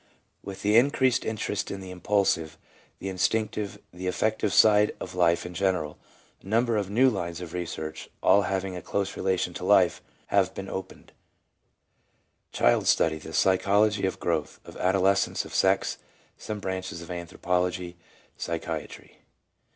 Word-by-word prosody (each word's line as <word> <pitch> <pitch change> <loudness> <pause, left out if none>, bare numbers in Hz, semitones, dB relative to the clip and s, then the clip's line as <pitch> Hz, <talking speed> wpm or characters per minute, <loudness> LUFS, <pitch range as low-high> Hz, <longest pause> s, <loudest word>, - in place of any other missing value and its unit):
With 100 -1 -8
the 105 +2 +4
increased 130 -1 +3
interest 110 -2 -2
in 100 - -5
the 95 -1 -8
impulsive, 90 -4 0 0.4
the 95 - -6
instinctive, 105 +2 -1 0.2
the 90 +1 -5
affective 110 +3 0
side 105 0 +5
of 90 - -7
life 85 -1 +2
in 90 - -7
general, 90 -5 -1 0.4
a - - -16
number 115 +2 +2
of 100 -3 -1
new 120 +6 +4
lines 85 -8 -2
of 90 -2 -8
research, 80 -3 -5
all 100 - +6
having 95 -1 -2
a 90 - -6
close 100 +4 -2
relation 95 -1 -1
to - - -7
life, - - +4 0.3
have - - +3
been 95 - -6
opened: 95 -1 -7 1.4
Child - - +2
study, 80 -1 +3
the 80 - -9
psychology 100 +3 +3
of 95 - -4
growth, 80 -3 -2
of - - -11
adoles 95 +1 +3
cence, - - -1
of - - -11
sex; - - +2 0.4
some 105 -1 -6
branches 95 -3 -4
of 85 - -9
anthropology, 90 0 -2 0.4
psychi - - -3
atry. - - -13
95 Hz, 150 wpm, -27 LUFS, 90-105 Hz, 1.4 s, all